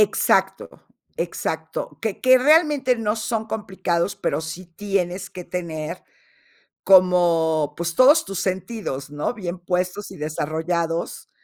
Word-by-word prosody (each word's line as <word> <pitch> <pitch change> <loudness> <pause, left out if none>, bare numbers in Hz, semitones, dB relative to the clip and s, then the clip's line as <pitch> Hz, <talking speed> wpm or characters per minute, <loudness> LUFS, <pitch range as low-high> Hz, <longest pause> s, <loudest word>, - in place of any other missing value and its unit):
Exacto, 210 -1 +2 0.5
exacto, - - -4
que 220 -3 -3
que 255 0 +6
realmente 295 -2 +4
no 225 -2 -1
son 220 0 -2
complicados, 190 -4 -2
pero 195 - -1
sí 160 +3 -7
tienes 195 -3 -2
que 180 - -8
tener 170 -1 -5 0.8
como, 170 -5 +4
pues, 170 0 -3
todos 285 - +6
tus 195 -2 -4
sentidos, 185 - -3
¿no? 145 +9 -2
Bien 185 -6 -5
puestos 180 +3 -2
y - - -11
desarrollados, 160 +2 -2
185 Hz, 120 wpm, -22 LUFS, 170-215 Hz, 0.8 s, que